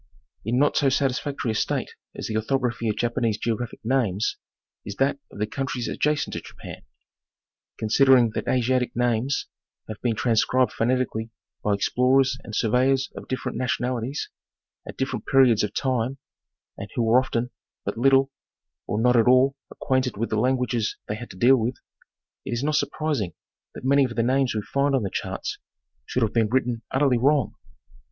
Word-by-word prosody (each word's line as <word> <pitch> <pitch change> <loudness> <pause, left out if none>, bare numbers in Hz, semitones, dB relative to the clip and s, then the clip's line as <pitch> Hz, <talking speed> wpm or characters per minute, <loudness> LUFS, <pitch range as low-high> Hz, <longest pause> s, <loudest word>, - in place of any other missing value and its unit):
In 115 +4 0
not 145 +2 +3
so 140 - +4
satisfactory 135 -2 -1
a - - -2
state 105 - -1 0.2
as - - -5
the 110 - -3
orthography 120 0 0
of 105 - 0
Japanese 120 -2 0
geographic 115 +1 -3
names 110 -5 0 0.5
is 100 - -7
that 140 +3 +1
of - - -12
the 105 - 0
countries 125 +1 -3
adjacent 150 0 0
to - - -4
Japan. - - -10 1.0
Considering 120 +1 +4
that - - -4
Asiatic 125 0 +1
names 120 +2 0 0.4
have 110 -2 -8
been 120 -2 0
transcribed 125 +3 +2
phoneti 130 +2 +1
eally 110 0 -6 0.3
by 105 -1 +2
explorers 130 +5 +2
and 110 - -7
surveyors 130 +5 +2
of - - -9
different 130 - -3
nationalities, 125 +1 -2 0.6
at - - -8
dif 135 0 -1
ferent - - -5
periods 130 -5 +5
of 105 - -1
time, 130 0 -1 0.6
and - - -6
who 120 - +1
were 115 +3 +5
often 125 -1 -2 0.3
but - - -2
little, 135 +2 +3 0.6
or 105 - -1
not 125 +2 +3
at 115 -1 +4
all, 130 +2 +5
acquainted 130 -5 -1
with 115 +2 -2
the 110 - +1
languages 125 -2 0
they - - -2
had 120 +2 -8
to - - -11
deal 130 +7 +5
with, 120 +2 -1 0.7
it - - -4
is 120 +3 -2
not 155 +1 0
surprising 145 - -1 0.4
that - - -8
many 140 +1 +4
of 120 -3 -2
the 115 - +1
names 130 0 +1
we 105 - -1
find 140 +3 +1
on 130 - +1
the 100 - -3
charts - - -4 0.5
should 125 - 0
have 110 - 0
been 115 -2 +2
written 125 -2 0
utterly 130 -2 +2
wrong. 140 +2 +2
125 Hz, 175 wpm, -24 LUFS, 115-135 Hz, 1.0 s, periods